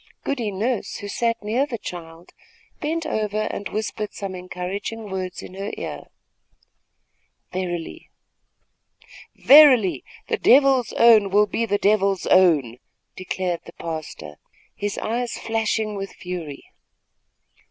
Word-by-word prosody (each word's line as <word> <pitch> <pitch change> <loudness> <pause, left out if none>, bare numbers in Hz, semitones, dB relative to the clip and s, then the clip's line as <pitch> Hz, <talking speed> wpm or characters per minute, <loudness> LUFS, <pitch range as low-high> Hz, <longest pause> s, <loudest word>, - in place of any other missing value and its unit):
Goody 245 -6 -2
Nurse, 215 +4 -2
who 205 - -6
sat 230 +2 -1
near 240 +7 0
the 245 -5 -4
child, 170 -3 -9 0.5
bent 325 +1 -2
over 215 -6 -1
and 200 - -5
whispered 215 -1 -4
some 195 -2 -5
encouraging 185 +4 -6
words 185 -1 -4
in - - -10
her 195 +2 -5
ear. - - -6 1.5
"Verily, 175 -3 -5 2.2
the 460 - -1
Devil's 270 -2 +5
own 220 -4 +6
will 205 +2 +4
be 230 +2 -2
the 205 -1 +1
Devil's 200 -2 +2
own!" 150 -11 +3 0.4
declared 185 -1 -3
the 170 - -12
pastor, 155 - -7 0.4
his 205 0 -4
eyes 240 +2 -2
flashing 220 -1 -1
with 195 -1 -6
fury. 170 -6 -7
205 Hz, 115 wpm, -23 LUFS, 180-225 Hz, 2.2 s, own